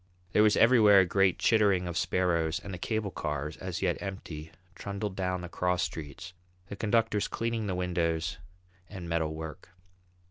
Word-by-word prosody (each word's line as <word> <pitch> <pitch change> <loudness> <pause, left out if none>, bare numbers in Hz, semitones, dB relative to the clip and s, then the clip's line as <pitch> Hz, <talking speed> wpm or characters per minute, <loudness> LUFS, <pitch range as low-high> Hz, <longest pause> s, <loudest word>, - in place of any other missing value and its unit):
There 105 - +4
was 105 -1 +4
everywhere 110 -4 +7
a - - +2
great 95 0 +2
chittering 100 -5 +3
of 85 - -4
sparrows, 85 -1 +1
and 100 -1 -8
the 90 - -6
cable 110 0 -2
cars, 75 -1 -3
as 90 0 -5
yet 90 -2 0
empty, 80 -6 -7 0.2
trundled 100 +2 -5
down 90 -1 -1
the 90 - -6
cross 90 +1 0
streets, 75 +2 -6 0.4
the - - -5
conductors 110 0 +1
cleaning 115 -2 -2
the 95 - -1
windows 85 -1 -1 0.5
and 95 -4 -7
metal 80 -2 -1
work. 80 0 -8
90 Hz, 165 wpm, -29 LUFS, 85-100 Hz, 0.5 s, everywhere